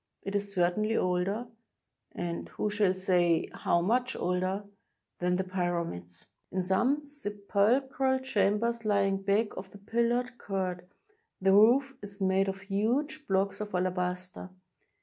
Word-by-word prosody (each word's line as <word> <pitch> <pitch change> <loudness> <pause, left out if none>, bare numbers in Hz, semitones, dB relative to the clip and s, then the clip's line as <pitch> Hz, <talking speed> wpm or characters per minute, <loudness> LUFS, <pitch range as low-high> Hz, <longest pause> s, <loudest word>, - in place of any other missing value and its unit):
It 195 - -4
is 200 0 -1
certainly 200 +4 +1
older 185 +5 0 0.4
— - - -57 0.2
and 170 -1 -4
who 210 - -2
shall 205 -3 +2
say 180 -3 +2
how 170 - +1
much 245 +7 +1
older? 185 +3 -1 0.3
— - - -54
than 180 0 +1
the 190 - 0
Pyramids. 170 - -3 0.3
In 185 0 -1
some 240 +11 +2
sepul 220 -2 0
chral 265 0 0
chambers 230 0 +1
lying 200 -2 +2
back 205 +3 +1
of 185 0 -7
the 205 - -13
pillared 235 +4 -1
court, 185 -2 -3 0.5
the 190 0 +3
roof 255 +6 +5
is 200 0 -8
made 190 0 +2
of 195 0 -4
huge 245 +11 -1
blocks 195 +1 0
of 210 -3 -4
alabaster. 180 0 -2
200 Hz, 145 wpm, -30 LUFS, 185-225 Hz, 0.5 s, roof